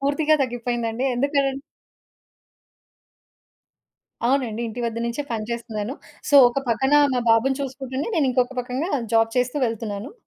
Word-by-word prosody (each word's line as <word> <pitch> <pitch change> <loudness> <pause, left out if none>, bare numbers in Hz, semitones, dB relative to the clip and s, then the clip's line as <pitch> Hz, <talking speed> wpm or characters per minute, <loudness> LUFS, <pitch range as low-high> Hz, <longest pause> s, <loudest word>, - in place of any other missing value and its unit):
పూర్తిగా 290 +3 +2
తగ్గిపోయిందండి. 240 0 -2
ఎందుకనం 275 +1 +1 2.7
అవునండి. 245 -4 0
ఇంటి 230 +3 -6
వద్ద 230 0 -2
నుంచే 235 +5 -3
పని 220 -2 -2
చేస్తున్నాను. 230 0 -4 0.4
సో, 290 - +2
ఒక 240 - -2
పక్కన 265 +4 +1 0.2
మా 250 - +1
బాబుని 260 +4 +3
చూసుకుంటనే 265 0 -4
నేను 285 -5 +2
ఇంకొక 250 +1 +1
పక్కంగా 255 +8 -3 0.2
జాబ్ 225 0 +4
చేస్తూ 250 +3 +1
వెళ్తున్నాను. 220 - -5
250 Hz, 125 wpm, -23 LUFS, 230-270 Hz, 2.7 s, జాబ్